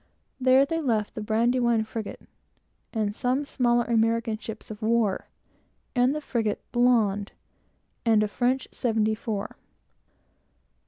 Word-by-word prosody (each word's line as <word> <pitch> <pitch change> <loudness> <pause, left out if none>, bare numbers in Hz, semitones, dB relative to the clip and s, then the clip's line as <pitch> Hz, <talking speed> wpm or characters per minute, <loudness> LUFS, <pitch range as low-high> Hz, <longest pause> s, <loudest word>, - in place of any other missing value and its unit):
There, 260 +1 +5
they 325 +3 -2
left 220 -7 0
the 220 - -5
Brandywine 235 +1 +2
frigate, 220 -1 -7 0.6
and 215 -3 0
other 255 +4 +1
smaller 240 -3 +2
American 230 0 +1
ships 220 -1 -8
of 210 - -9
war, 220 -3 +1 0.7
and 245 0 +4
the - - -4
English 305 - -6
frigate 225 -6 -1
Blonde, 225 -5 +2 0.7
and 220 -2 +4
a - - +1
French 250 +5 0
seventy 220 -2 +1
four. 215 -2 -4
230 Hz, 125 wpm, -26 LUFS, 215-245 Hz, 0.7 s, There